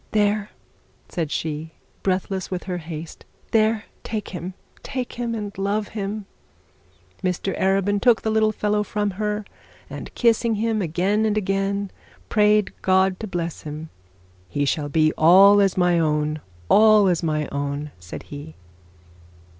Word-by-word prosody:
'There,' 210 0 +2 0.6
said 165 -4 -2
she, 155 +1 -3 0.3
breathless 190 0 -1
with 185 -1 -3
her 180 -2 -3
haste; 160 -1 -8 0.3
'there, 220 0 +2 0.2
take 215 -2 -4
him 180 +1 -6 0.3
take 255 -3 -4
him 235 -1 -3
and 205 -2 -5
love 205 +2 -1
him.' 205 0 -4 1.0
Mr 185 +1 -1
Arabin 195 +1 +2
took 240 -3 +4
the 220 - 0
little 220 0 +3
fellow 210 0 0
from 210 -1 -1
her, 210 +2 -2 0.5
and - - -7
kissing 230 -1 +3
him 220 0 0
again 185 +5 +1
and 215 -1 +1
again, 195 0 -1 0.4
prayed 210 -1 +3
God 190 0 +3
to 220 - -5
bless 170 -3 -4
him. 155 +1 -7 0.6
'He 145 +6 0
shall 145 +1 -1
be 155 +1 +3
all 195 +5 +7
as 195 -2 +2
my 180 -1 +3
own 150 -1 0 0.3
all 215 - +6
as 175 -3 +2
my 155 -3 -1
own,' 145 +1 -3
said 85 0 -8
he. 145 +2 -9
195 Hz, 145 wpm, -23 LUFS, 165-210 Hz, 1.0 s, all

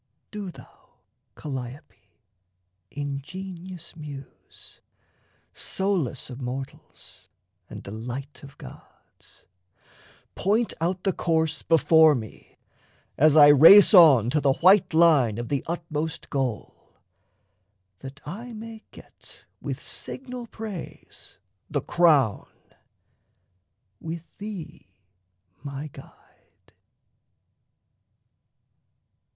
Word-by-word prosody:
Do 205 -3 -6
thou, - - -17 0.4
Calliope, 135 -4 -9 0.8
ingenious 170 +5 -7
Muse, 145 -4 -12 0.7
Solace 180 -10 -3
of 125 +2 -9
mortals 130 +2 -9 0.4
and - - -9
delight 125 +7 -8
of 140 0 -14
gods, - - -17 0.9
Point 215 +4 0
out 180 +2 -2
the 195 - 0
course 160 -2 -1
before 160 -1 +4
me, 110 -4 -10 0.6
as 155 +1 +4
I 145 -2 +8
race 165 +9 +8
On 140 - +7
to 150 +1 +1
the 140 -2 +3
white 190 +7 +4
line 150 -10 +4
of 120 0 -5
the 140 -2 -1
utmost 160 -2 -5
goal, 130 -7 -5 1.0
That 135 +2 -11
I 230 +9 -8
may 225 0 -10
get - - -17 0.2
with - - -5
signal 250 -2 -7
praise 215 -6 -10 0.3
the 145 - -1
crown, 145 - +2 1.5
With 165 0 -8
thee 200 - -8 0.7
my 140 +1 -7
guide! - - -19
155 Hz, 90 wpm, -25 LUFS, 135-185 Hz, 1.5 s, I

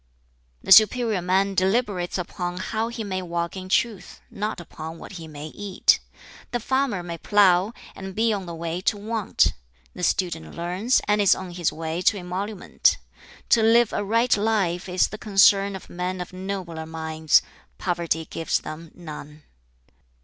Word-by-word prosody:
"The - - -4
superior 215 0 +6
man 190 +2 +1
deliberates 190 -1 0
upon 180 0 -4
how 220 +4 -2
he 235 -1 -5
may 190 -2 -3
walk 170 -1 -3
in 185 0 -7
truth, 215 0 -1
not 210 -1 -3
upon 160 -1 -8
what - - -10
he 170 -4 -8
may 150 0 -8
eat. 200 +2 +2 0.5
The 240 - -2
farmer 260 -6 0
may 170 -1 -6
plough, 195 0 +4 0.2
and 190 -1 -8
be 225 0 +2
on 195 -3 -4
the 170 - -6
way 165 +2 -4
to 205 - +1
want: 215 0 +1 0.4
the - - -9
student 170 -4 -1
learns, 180 +9 +1
and 210 0 +3
is 200 - +5
on 185 -1 -7
his 175 -2 -1
way 160 +2 -4
to 205 - +3
emolument. 185 +2 0 0.5
To 230 - +5
live 230 +1 +4
a - - -1
right 230 +4 +3
life 200 -4 0
is 180 0 +2
the 215 - -8
concern 195 -1 +4
of 190 - -9
men 180 +1 -4
of 180 0 -6
nobler 185 -4 -5
minds: 160 -1 +2 0.3
poverty 170 -3 -1
gives 165 - -1
them 155 +2 -8
none. 150 -3 -10
185 Hz, 165 wpm, -24 LUFS, 170-205 Hz, 0.5 s, superior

